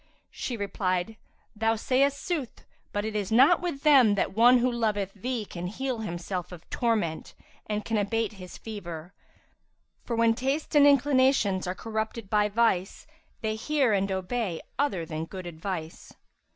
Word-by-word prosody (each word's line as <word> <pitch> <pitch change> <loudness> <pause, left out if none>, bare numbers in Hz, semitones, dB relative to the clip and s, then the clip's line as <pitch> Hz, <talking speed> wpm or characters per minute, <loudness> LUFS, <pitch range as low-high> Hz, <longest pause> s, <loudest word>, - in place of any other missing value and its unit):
She 245 - -4
replied, 195 0 -1 0.4
"Thou 225 +1 +1
sayest 275 +5 +1
sooth, 320 -10 -4 0.3
but 205 0 -2
it 220 -1 -4
is 205 -1 -2
not 270 +11 +6
with 340 -6 -4
them 265 -9 +6
that 195 - -1
one 240 +3 +7
who 250 +1 +2
loveth 210 -5 -1
thee 235 +2 -3
can 180 -2 -6
heal 255 +4 -3
himself 180 -2 -4
of 175 -2 -11
torment 215 -10 -1 0.3
and 210 -1 -2
can 225 - 0
abate 220 +1 -1
his 185 -3 -10
fever; 180 -5 -8 0.9
for, 235 - -3
when 230 0 +4
tastes 270 +6 -2
and 290 -1 +7
inclinations 260 -9 +3
are 180 - -2
corrupted 220 0 -4
by 210 -1 +3
vice, 205 -4 +1 0.4
they 220 -1 -1
hear 260 +1 +1
and 195 0 +1
obey 190 -1 -2 0.2
other 230 - 0
than 155 0 -4
good 185 +1 -8
advice. 165 -1 -6
220 Hz, 155 wpm, -27 LUFS, 190-250 Hz, 0.9 s, one